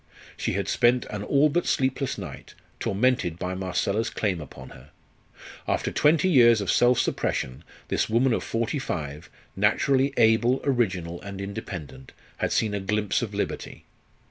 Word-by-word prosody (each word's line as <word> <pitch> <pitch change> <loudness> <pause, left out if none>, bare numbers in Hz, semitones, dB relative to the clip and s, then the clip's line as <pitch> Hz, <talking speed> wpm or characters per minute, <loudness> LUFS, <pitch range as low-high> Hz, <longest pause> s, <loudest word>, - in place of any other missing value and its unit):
She - - -2
had - - -2
spent 120 0 +3
an 105 - -4
all 140 +7 +3
but 175 +4 0
sleepless 130 0 0
night, - - -9 0.2
tormented 100 -6 +1
by 90 +1 -3
Marcella's 95 +4 -1
claim 95 -6 -2
upon 75 - -11
her. 70 +4 -15 0.8
After - - 0
twenty 160 +5 +3
years 120 -9 +6
of 100 - 0
self 125 0 +4
suppression 65 - -1 0.3
this - - 0
woman 120 +3 +3
of - - -1
forty 115 +5 -2
five, 75 - -5 0.3
naturally 130 +7 +2
able, 115 +3 +4
original, 95 -10 -1
and 100 -1 -8
independent, 85 - -7 0.2
had - - -1
seen 110 -2 +1
a 100 - -1
glimpse 105 0 0
of 105 -4 -4
liberty. 100 - -4
105 Hz, 150 wpm, -25 LUFS, 95-125 Hz, 0.8 s, years